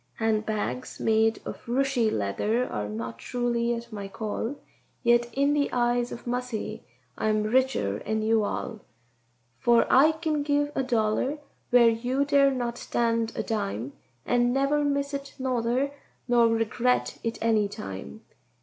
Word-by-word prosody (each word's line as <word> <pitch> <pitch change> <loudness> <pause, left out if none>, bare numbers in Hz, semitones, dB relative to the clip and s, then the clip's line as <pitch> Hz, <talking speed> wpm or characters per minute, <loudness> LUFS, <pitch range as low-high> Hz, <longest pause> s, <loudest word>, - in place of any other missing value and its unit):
"Hand 220 -1 0
bags 220 +4 -3
made 225 0 +2
of - - -7
Rooshy 250 -2 +2
leather 155 - 0
are 105 0 -4
not 115 +2 -5
truly 240 - -1
at 235 0 -8
my 200 -2 -5
call, 220 +5 -4 0.5
Yet 240 0 +3
in 280 +4 +2
the 290 -1 +1
eyes 240 0 +1
of 235 - -8
Mussy 245 -2 -3 0.4
I - - 0
am 215 0 +2
richer 215 - +1
'en 220 0 -1
you 220 0 +3
all, 220 +2 -3 0.8
For 235 -1 +4
I 295 +5 +6
kin 315 -2 -1
give 290 0 +1
a - - 0
dollar 240 +3 0 0.3
wher' 245 -1 +7
you 250 +5 0
dare 280 -1 +5
not 240 -3 -3
stand 230 -1 0
a - - -2
dime, 130 - -3 0.3
And 245 0 +2
never 275 +3 +2
miss 280 0 0
it 280 0 -5
nother, 255 +1 0 0.4
nor 240 -1 +5
regret 225 +2 0
it 230 -1 -2
any 220 -2 +2
time." 95 - -7
235 Hz, 150 wpm, -27 LUFS, 220-260 Hz, 0.8 s, wher